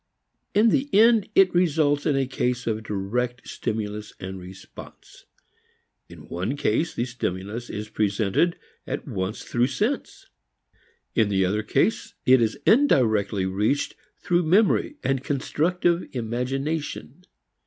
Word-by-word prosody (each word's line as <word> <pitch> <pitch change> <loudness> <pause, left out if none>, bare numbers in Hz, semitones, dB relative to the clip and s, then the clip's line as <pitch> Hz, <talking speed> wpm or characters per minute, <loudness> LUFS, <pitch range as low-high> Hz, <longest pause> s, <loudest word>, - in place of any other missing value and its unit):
In 215 +3 +5
the 275 +4 +1
end 220 -1 +5
it 195 -1 +5
results 155 -5 +2
in 145 - +2
a 135 -1 +1
case 125 -1 -2
of 110 -1 -1
direct 115 +4 -3
stimulus 105 -1 -4
and 95 0 -6
response. 95 +1 -13 0.8
In - - -13
one 95 +11 -3
case 150 +4 0
the 120 - -1
stimulus 115 -1 -4
is 105 +1 -5
presented 105 - +1 0.3
at - - -4
once 100 -4 -3
through 120 +1 +1
sense; 255 - -2 0.9
in 110 -3 +2
the 95 -2 +2
other 105 +4 0
case, 110 - 0
it 130 -1 +6
is 115 -1 0
indirectly 110 - +3
reached 105 +9 0 0.2
through 175 0 +1
memory 195 - +2
and 135 -1 0
constructive 170 +5 0
imagination. 135 +8 -3
125 Hz, 125 wpm, -24 LUFS, 105-160 Hz, 0.9 s, it